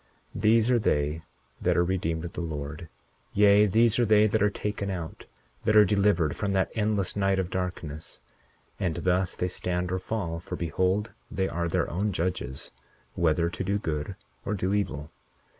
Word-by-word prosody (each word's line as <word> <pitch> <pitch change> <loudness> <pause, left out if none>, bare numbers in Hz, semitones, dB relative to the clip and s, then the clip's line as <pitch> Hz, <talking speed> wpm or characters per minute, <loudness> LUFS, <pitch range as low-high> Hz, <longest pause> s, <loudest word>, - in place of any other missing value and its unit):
41:7 - - -4
These 115 +2 +4
are 120 - +4
they 75 -5 0 0.4
that - - +2
are 85 - +4
redeemed 85 -2 -1
of 85 - -7
the - - -4
Lord; 80 0 -5 0.5
yea, 105 +1 +6
these 115 +3 +3
are 120 - +4
they 105 0 +6
that 110 0 +1
are 105 - +4
taken 100 -1 -3
out, 85 -4 -6 0.4
that 110 - +2
are 105 -1 +8
delivered 100 -6 +2
from 100 -2 -1
that 95 -1 +1
endless 105 -4 0
night 95 -1 +2
of 95 -1 -2
darkness; 85 -5 -4 0.6
and 90 -5 0
thus 90 +2 +1
they 90 - -1
stand 90 0 -2
or 95 - 0
fall; 90 -5 -3
for - - -6
behold, 95 +5 0 0.2
they 95 0 -1
are 85 -1 -2
their - - 0
own 100 +4 -1
judges, 85 -7 -3 0.4
whether 85 0 +2
to 95 - -4
do 100 +2 0
good 80 -1 -3 0.3
or 105 - -2
do 95 0 -1
evil. 80 -7 -2
95 Hz, 180 wpm, -27 LUFS, 85-105 Hz, 0.6 s, are